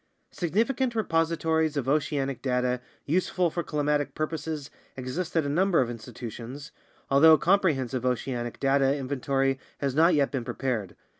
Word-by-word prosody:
Significant 235 - 0
repositories 165 -5 +1
of 135 -2 -2
oceanic 140 -2 0
data 125 -1 0 0.2
useful 180 +2 +1
for 175 - -2
climatic 150 -2 -1
purposes 155 -1 -4 0.3
exist 155 +8 -3
at 160 - +2
a - - -1
number 175 +5 +2
of 120 -2 +1
institutions, 120 +4 -8 0.4
although 155 +4 +8
a - - +7
comprehensive 145 -10 +1
oceanic 125 -1 -2
data 135 0 +3
inventory 135 0 0 0.2
has 140 -2 -1
not 165 +4 +5
yet 140 -2 +2
been 135 -4 -2
prepared. 115 -6 -3
145 Hz, 140 wpm, -27 LUFS, 130-165 Hz, 0.4 s, although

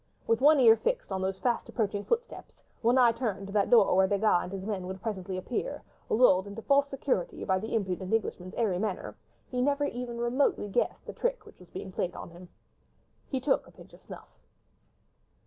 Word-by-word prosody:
With 230 +2 +1
one 295 +1 +6
ear 230 -3 +8
fixed - - -2
on 190 - -2
those 190 0 -2
fast 240 +3 -1
approaching 205 -3 -2
footsteps, 470 - -4 0.2
one 240 +2 +3
eye 245 -2 +6
turned 215 -5 -3
to 195 - -9
that 205 -2 +2
door 220 -6 +5
where 190 0 +5
Desgas 200 -2 +2
and 180 - -7
his 195 -1 -6
men 195 -4 -3
would 190 +1 -6
presently 190 -3 -4
appear, 245 - -4 0.3
lulled 205 -5 +4
into 205 +2 -8
false 280 0 +3
security 270 -9 -2
by 190 0 +1
the 220 +3 -4
impudent 190 -3 -2
Englishman's 190 -4 -2
airy 205 -6 0
manner, 215 +1 -3 0.4
he 250 -1 -1
never 285 +2 +1
even 245 -3 -5
remotely 240 -1 +1
guessed 240 - -1
the - - -7
trick - - -2
which - - -16
was 180 -2 -16
being 190 0 -7
played 180 - -1
upon - - -8
him. 175 +1 -13 0.8
He 265 - -1
took 265 +1 +1
a - - -16
pinch - - -16
of - - -16
snuff. - - -13
220 Hz, 200 wpm, -29 LUFS, 190-250 Hz, 0.8 s, ear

